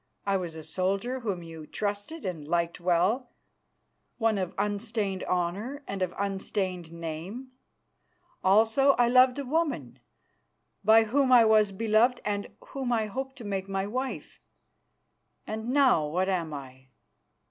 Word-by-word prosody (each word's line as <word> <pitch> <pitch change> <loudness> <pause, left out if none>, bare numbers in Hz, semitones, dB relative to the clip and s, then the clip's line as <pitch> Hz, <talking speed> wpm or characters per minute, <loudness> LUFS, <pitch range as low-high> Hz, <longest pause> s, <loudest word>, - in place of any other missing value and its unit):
I 200 -1 +1
was 175 -4 -3
a 160 - -8
soldier 195 +10 -1
whom 200 -8 -3
you 160 -2 -10
trusted 205 +9 -4
and 165 -6 -4
liked 170 +1 0
well, 185 +8 +1 0.9
one 225 -3 +1
of 185 -2 -3
unstained 205 -2 -2
honour 200 +11 -2
and 195 -1 -4
of 180 -1 -1
unstained 190 -3 -2
name. 170 +10 -6 0.9
Also 225 +8 +5
I 245 -2 +3
loved 255 +1 +5
a 280 - -3
woman, 250 - -1 0.8
by 220 +2 +7
whom 260 +4 +1
I 240 -2 +8
was 215 -2 +4
beloved 225 +4 +2
and 205 -1 -1 0.2
whom 265 -3 -3
I 225 -2 +2
hoped 265 +5 -5
to 250 - -10
make 195 -2 -3
my 195 0 -1
wife. 255 +5 -4 1.1
And 220 +2 -4
now 255 - +4
what 180 +5 0
am 170 -4 -1
I? 130 -2 -9
205 Hz, 140 wpm, -28 LUFS, 180-245 Hz, 1.1 s, I